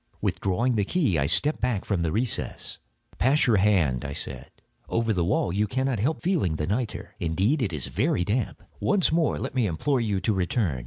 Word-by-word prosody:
Withdrawing 115 Hz, +6 st, 0 dB
the 105 Hz, -, +2 dB
key 115 Hz, -, +1 dB
I 70 Hz, -, +1 dB
stepped 95 Hz, -, +2 dB
back 120 Hz, -5 st, 0 dB
from 100 Hz, -5 st, 0 dB
the 80 Hz, -2 st, 0 dB
recess. 115 Hz, +3 st, -2 dB, 0.4 s
"Pass 140 Hz, +5 st, +4 dB
your 115 Hz, -4 st, +4 dB
hand," 90 Hz, -11 st, +2 dB
I 70 Hz, -, -4 dB
said, 65 Hz, -1 st, -5 dB, 0.4 s
"over 115 Hz, -1 st, +1 dB
the 90 Hz, -3 st, +1 dB
wall; 90 Hz, 0 st, +1 dB
you 105 Hz, +2 st, +1 dB
cannot 130 Hz, +1 st, -1 dB
help 140 Hz, +10 st, -1 dB
feeling 165 Hz, -, +1 dB
the 75 Hz, -, -2 dB
nitre. 110 Hz, +6 st, -3 dB
Indeed 95 Hz, -, +1 dB
it 105 Hz, -6 st, 0 dB
is 75 Hz, -6 st, -3 dB
very 90 Hz, -, 0 dB
damp. 110 Hz, +3 st, -2 dB, 0.2 s
Once 200 Hz, -6 st, +2 dB
more 160 Hz, -1 st, +2 dB
let -, -, -4 dB
me 125 Hz, -5 st, +1 dB
implore 125 Hz, -, 0 dB
you 105 Hz, -4 st, 0 dB
to 110 Hz, -, +1 dB
return. 90 Hz, -, 0 dB
105 Hz, 200 wpm, -26 LUFS, 90-125 Hz, 0.4 s, Pass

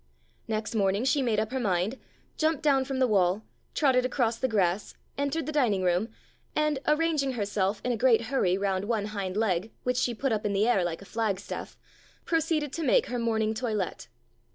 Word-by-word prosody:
Next 215 Hz, 0 st, -2 dB
morning 200 Hz, 0 st, +1 dB
she 275 Hz, +2 st, +2 dB
made 230 Hz, -5 st, +1 dB
up 220 Hz, +1 st, -2 dB
her 265 Hz, -, -1 dB
mind, 200 Hz, +2 st, 0 dB, 0.4 s
jumped 315 Hz, -2 st, 0 dB
down 275 Hz, -3 st, +3 dB
from 270 Hz, 0 st, -3 dB
the 260 Hz, -, +4 dB
wall, 195 Hz, -1 st, +2 dB, 0.3 s
trotted 260 Hz, -4 st, +3 dB
across 240 Hz, -3 st, 0 dB
the 260 Hz, -, +1 dB
grass, 195 Hz, -4 st, 0 dB, 0.2 s
entered 285 Hz, +3 st, -1 dB
the 310 Hz, -, -3 dB
dining 235 Hz, -11 st, +2 dB
room, 180 Hz, +5 st, +1 dB, 0.5 s
and, 305 Hz, -2 st, +1 dB
arranging 300 Hz, -3 st, +2 dB
herself 205 Hz, -2 st, -1 dB
in 250 Hz, -, +1 dB
a 235 Hz, -, -1 dB
great 235 Hz, -1 st, +4 dB
hurry 225 Hz, -7 st, +1 dB
round 195 Hz, -1 st, -1 dB
one 215 Hz, -2 st, 0 dB
hind 195 Hz, -2 st, -3 dB
leg, 210 Hz, -1 st, 0 dB
which 250 Hz, 0 st, 0 dB
she 245 Hz, -2 st, +1 dB
put 270 Hz, +3 st, -1 dB
up 215 Hz, -1 st, 0 dB
in 205 Hz, -1 st, 0 dB
the 205 Hz, +3 st, +2 dB
air 200 Hz, -7 st, +3 dB
like 175 Hz, +2 st, -3 dB
a -, -, -13 dB
flagstaff, 205 Hz, -3 st, -3 dB, 0.5 s
pro 330 Hz, -, +2 dB
ceeded 310 Hz, -3 st, -1 dB
to 330 Hz, -, -4 dB
make -, -, +4 dB
her 245 Hz, -, -2 dB
morning 220 Hz, -2 st, +1 dB
toilet. 215 Hz, -, -3 dB
225 Hz, 200 wpm, -28 LUFS, 200-265 Hz, 0.5 s, the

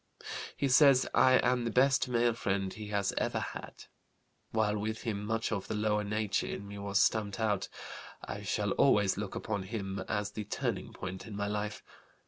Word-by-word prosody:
He 140 Hz, -, +1 dB
says 135 Hz, 0 st, +6 dB
I 130 Hz, -, +6 dB
am 125 Hz, -1 st, +2 dB
the 115 Hz, -, -1 dB
best 125 Hz, +2 st, +3 dB
male 120 Hz, -1 st, +2 dB
friend 95 Hz, -3 st, -1 dB
he 105 Hz, -1 st, -7 dB
has 100 Hz, -1 st, 0 dB
ever -, -, 0 dB
had. -, -, -7 dB, 0.7 s
While 105 Hz, -1 st, +1 dB
with 110 Hz, +1 st, -3 dB
him, 105 Hz, -4 st, -2 dB
much 115 Hz, +2 st, -1 dB
of 100 Hz, -3 st, -2 dB
the -, -, -3 dB
lower 105 Hz, 0 st, +1 dB
nature 105 Hz, -1 st, -1 dB
in 100 Hz, -, -5 dB
me 100 Hz, 0 st, -8 dB
was 100 Hz, 0 st, 0 dB
stamped 105 Hz, -1 st, +2 dB
out. 105 Hz, -3 st, 0 dB, 0.6 s
I -, -, -5 dB
shall -, -, -1 dB
always 100 Hz, -2 st, +4 dB
look 100 Hz, -1 st, -4 dB
upon 105 Hz, -4 st, -2 dB
him 95 Hz, -1 st, -4 dB
as 105 Hz, -1 st, -1 dB
the 105 Hz, 0 st, -5 dB
turning -, -, -2 dB
point 95 Hz, +3 st, -7 dB
in 105 Hz, -, -7 dB
my 100 Hz, 0 st, -1 dB
life. 105 Hz, 0 st, -3 dB
105 Hz, 185 wpm, -32 LUFS, 100-115 Hz, 0.7 s, says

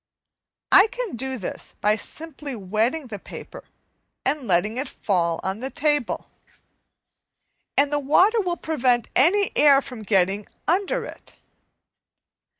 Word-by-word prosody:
I 390 Hz, -, +8 dB
can -, -, -5 dB
do 265 Hz, +2 st, -3 dB
this 195 Hz, -, -6 dB
by 210 Hz, +1 st, +3 dB
simply 295 Hz, +2 st, -6 dB
wetting 220 Hz, +9 st, -1 dB
the 215 Hz, -5 st, -7 dB
paper -, -, -10 dB, 0.6 s
and 275 Hz, -2 st, -1 dB
letting 205 Hz, +5 st, +1 dB
it 265 Hz, -, -2 dB
fall 170 Hz, -4 st, 0 dB
on 190 Hz, +2 st, -3 dB
the 260 Hz, +2 st, -4 dB
table, 295 Hz, -4 st, 0 dB, 1.5 s
and 285 Hz, +1 st, +3 dB
the 290 Hz, -, +2 dB
water 370 Hz, -, +4 dB
will 350 Hz, -3 st, -2 dB
prevent 255 Hz, -8 st, 0 dB
any 385 Hz, +8 st, +4 dB
air 285 Hz, -2 st, +6 dB
from 255 Hz, -5 st, -8 dB
getting 195 Hz, 0 st, +1 dB, 0.2 s
under 400 Hz, +8 st, +1 dB
it. -, -, -12 dB
270 Hz, 130 wpm, -23 LUFS, 215-320 Hz, 1.5 s, I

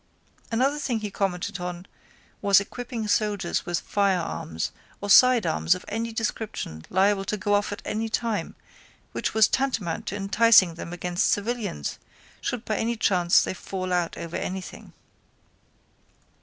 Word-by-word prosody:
Another 270 Hz, +6 st, +1 dB
thing 240 Hz, -6 st, -1 dB
he 210 Hz, -1 st, -4 dB
commented 180 Hz, -2 st, -2 dB
on 180 Hz, 0 st, -5 dB, 0.6 s
was 200 Hz, -1 st, +6 dB
equipping 235 Hz, +2 st, -5 dB
soldiers 205 Hz, -4 st, 0 dB
with 175 Hz, -1 st, -1 dB
firearms 180 Hz, -, -1 dB, 0.3 s
or 205 Hz, 0 st, -2 dB
sidearms 215 Hz, -, +5 dB
of -, -, -9 dB
any 230 Hz, +2 st, -3 dB
description 220 Hz, -, -4 dB
liable 195 Hz, +1 st, +3 dB
to 215 Hz, -, -2 dB
go 205 Hz, +1 st, 0 dB
off 205 Hz, 0 st, +1 dB
at 205 Hz, +3 st, -6 dB
any 225 Hz, +1 st, -2 dB
time 225 Hz, -1 st, -2 dB, 0.6 s
which -, -, -3 dB
was 220 Hz, -1 st, +6 dB
tantamount 225 Hz, -11 st, -1 dB
to 205 Hz, -, -2 dB
inciting 200 Hz, -2 st, +5 dB
them 170 Hz, +1 st, -8 dB
against 175 Hz, 0 st, 0 dB
civilians 205 Hz, -, -2 dB, 0.4 s
should 245 Hz, -1 st, -3 dB
by 215 Hz, -, -1 dB
any 235 Hz, +1 st, 0 dB
chance 180 Hz, -5 st, +4 dB
they -, -, -2 dB
fall 185 Hz, 0 st, -4 dB
out 175 Hz, -2 st, 0 dB
over 170 Hz, 0 st, -6 dB
anything. 185 Hz, 0 st, -6 dB
205 Hz, 140 wpm, -25 LUFS, 180-225 Hz, 0.6 s, was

